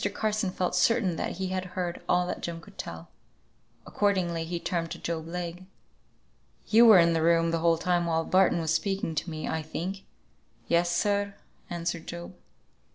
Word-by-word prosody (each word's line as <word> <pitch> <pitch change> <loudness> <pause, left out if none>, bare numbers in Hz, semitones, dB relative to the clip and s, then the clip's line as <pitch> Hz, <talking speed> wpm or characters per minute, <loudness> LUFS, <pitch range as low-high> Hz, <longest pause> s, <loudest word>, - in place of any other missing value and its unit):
Carson 215 -2 0
felt 185 -1 -2
certain 185 0 +2
that - - -2
he 190 +1 -3
had 185 0 -2
heard 175 -1 -2
all 180 0 +3
that 180 - -4
Jem 170 -1 -4
could - - -17
tell. 85 0 -7 0.8
Accordingly 180 -5 0
he 170 +1 -3
turned 170 -1 -2
to 170 - -6
Job 165 -2 -4
Legh. 175 +1 -5 1.0
"You 230 +2 +7
were 215 -4 +9
in 170 -1 +5
the 165 - +1
room 165 0 +3
the 165 - 0
whole 165 0 +3
time 175 0 +1
while 165 -1 0
Barton 185 -2 +3
was 160 -1 0
speaking 195 0 -1
to 160 - -3
me, 155 -1 -5
I 160 - -1
think?" 180 +5 -5 0.6
"Yes, 170 +1 +2
sir," 200 +3 0 0.3
answered 170 -1 -3
Job. 170 +2 -7
175 Hz, 175 wpm, -28 LUFS, 165-185 Hz, 1.0 s, were